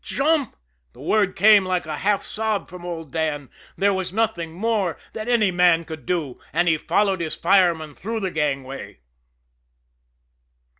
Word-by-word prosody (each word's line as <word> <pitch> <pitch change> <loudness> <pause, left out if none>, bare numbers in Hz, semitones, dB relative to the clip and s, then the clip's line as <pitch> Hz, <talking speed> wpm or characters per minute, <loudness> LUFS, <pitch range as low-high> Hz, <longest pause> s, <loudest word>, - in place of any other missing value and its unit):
"Jump!" 285 -1 0 0.4
The - - -18
word 205 -3 +1
came 210 -1 +6
like 185 -2 -1
a 155 -1 -4
half 200 0 +1
sob 220 -2 -2
from 180 -1 -10
old 165 -4 -6
Dan. 150 -3 -2 0.3
There 200 0 +3
was 190 -1 -3
nothing 200 -6 -1
more 195 -1 -1 0.2
that 220 0 -5
any 225 -5 +3
man 175 -2 +3
could 155 -6 -9
do. 160 -8 -2
And 175 - +1
he 160 -2 +3
followed 195 -1 +1
his 160 -2 -2
fireman 170 -5 +2
through 220 +8 -4
the 190 -2 -2
gangway. 135 - -3
180 Hz, 155 wpm, -23 LUFS, 160-210 Hz, 0.4 s, came